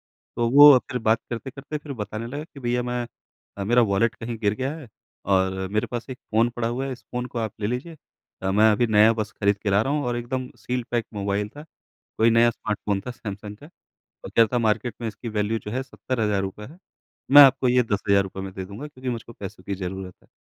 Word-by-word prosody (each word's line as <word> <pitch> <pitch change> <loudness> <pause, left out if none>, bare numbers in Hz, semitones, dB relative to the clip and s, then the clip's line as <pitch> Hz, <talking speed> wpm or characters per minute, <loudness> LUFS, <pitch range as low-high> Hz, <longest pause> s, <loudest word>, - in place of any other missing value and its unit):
तो 120 -1 -3
वो 145 0 +10
फिर 125 - -1
बात 110 0 +2
करते-करते 135 +5 -5
फिर 150 -1 -8
बताने 110 0 -5
लगे 145 +5 -6
कि 155 -4 -14
भईया 125 -1 0
मैं 120 0 -2 0.5
अ, 100 - -3
मेरा 120 +5 +4
वॉलेट 110 +1 +2
कहीं 115 0 -6
गिर 105 -2 +1
गया 130 +5 -2
है 150 -6 -11 0.4
और 95 -1 +1
मेरे 105 +1 0
पास 120 +1 -5
एक 130 - -6
फ़ोन 115 +2 +3
पड़ा 115 -1 -1
हुआ 125 +3 -2
है, 135 - -4
इस 125 - -7
फ़ोन 125 0 -4
को 125 -1 -5
आप 110 -2 -2
ले 105 - 0
लीजिए। 125 +8 -4 0.5
अ, 95 0 0
मैं 110 +3 +5
अभी 120 +3 +2
नया 110 +1 +5
बस 110 -1 -3
खरीद 100 0 +1
के 105 - -2
ला 100 +1 +4
रहा 135 +5 -1
हूँ 150 -1 0
और 120 -1 -1
एकदम 125 +2 -4
सील 125 0 -3
पैक 120 -2 0
मोबाइल 100 0 -2
था, 145 +6 -11 0.5
कोई 115 +1 +5
नया 115 +1 +5
स्मार्टफ़ोन 105 -2 -3
था - - -2
सैमसंग 105 -2 -8
का 145 - -14 0.6
और - - -7
कह 115 - +5
रहा 115 - +3
था 125 - +2
मार्केट 115 0 0
में 115 - -2
इसकी 115 +2 -7
वैल्यू 105 +1 -1
जो 105 - -8
है 130 +2 -1
₹70000 105 -6 -2
है। 160 +8 -14 0.5
मैं 145 0 +12
आपको 135 -1 +5
ये 125 0 +4
₹10000 100 -1 +1
में 95 - -7
दे 95 - -5
दूँगा 100 +10 -8
क्योंकि 130 -3 -8
मुझको 115 -1 -6
पैसों 100 -1 -9
की 100 - -3
ज़रूरत 95 0 -6
है। - - -26
115 Hz, 230 wpm, -24 LUFS, 105-125 Hz, 0.6 s, मैं